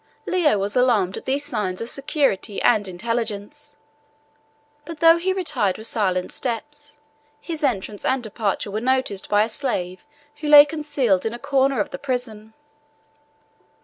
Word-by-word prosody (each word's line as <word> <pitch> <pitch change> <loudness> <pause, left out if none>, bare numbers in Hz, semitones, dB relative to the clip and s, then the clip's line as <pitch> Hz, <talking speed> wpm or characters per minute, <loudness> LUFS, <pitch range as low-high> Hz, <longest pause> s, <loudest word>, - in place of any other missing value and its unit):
Leo 330 - +2
was 200 +1 -2
alarmed 230 -7 +2
at - - -9
these 280 +2 -1
signs 210 -10 -2
of 230 - -4
security 270 -7 -1
and 205 -2 +3
intelligence; 220 +6 -4 1.1
but 330 -1 -9
though 330 0 +7
he 365 +3 -1
retired 295 - -1
with 220 - -8
silent 185 -6 -1
steps, 295 +5 -6 0.4
his 320 -3 -6
entrance 210 -6 -2
and 260 -1 0
departure 210 -2 -2
were 215 +2 -3
noticed 255 -6 -1
by 205 0 +4
a - - -1
slave 190 -7 -3 0.3
who 305 - -5
lay 295 -1 +10
concealed 285 - 0
in 225 +1 -3
a - - -6
corner 275 0 +1
of 295 - -1
the - - -6
prison. 225 -5 -5
240 Hz, 150 wpm, -22 LUFS, 205-290 Hz, 1.1 s, lay